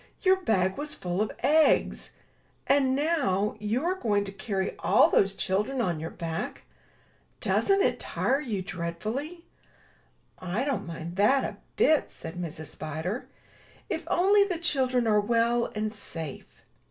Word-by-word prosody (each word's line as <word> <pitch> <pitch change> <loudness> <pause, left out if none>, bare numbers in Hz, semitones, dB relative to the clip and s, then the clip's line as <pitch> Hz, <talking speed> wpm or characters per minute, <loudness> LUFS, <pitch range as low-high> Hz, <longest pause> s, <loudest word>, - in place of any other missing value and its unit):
Your 380 -1 +5
bag 195 - 0
was 300 0 -4
full 180 +2 -2
of 215 - 0
eggs! 305 +4 +3 0.5
And, 270 -2 +3
now, 270 - +1
you 220 +8 -1
are 360 - +2
going 210 - 0
to 195 - -6
carry 195 -1 -3
all - - +4
those 195 0 +3
children 210 +8 0
on 175 -9 0
your 160 +1 -4
back? 165 -1 -5 0.8
Doesn't 395 0 +3
it - - +1
tire 275 - 0
you 215 -9 -3
dreadfully?" 215 - -4 1.0
''I 185 +8 -2
don't 245 -11 -2
mind 170 +1 -7
that 255 +7 +4
a - - -4 0.2
bit,*' 310 -2 +3
said 160 - -8
Mrs. 160 -3 -5
Spider, 160 - -4 0.6
*'if - - -3
only 400 +3 +5
the 380 -4 -2
children 260 -7 +1
are 210 -2 +4
well 235 +2 +1
and 215 0 -2
safe. 160 -9 -8
215 Hz, 145 wpm, -28 LUFS, 185-280 Hz, 1.0 s, Your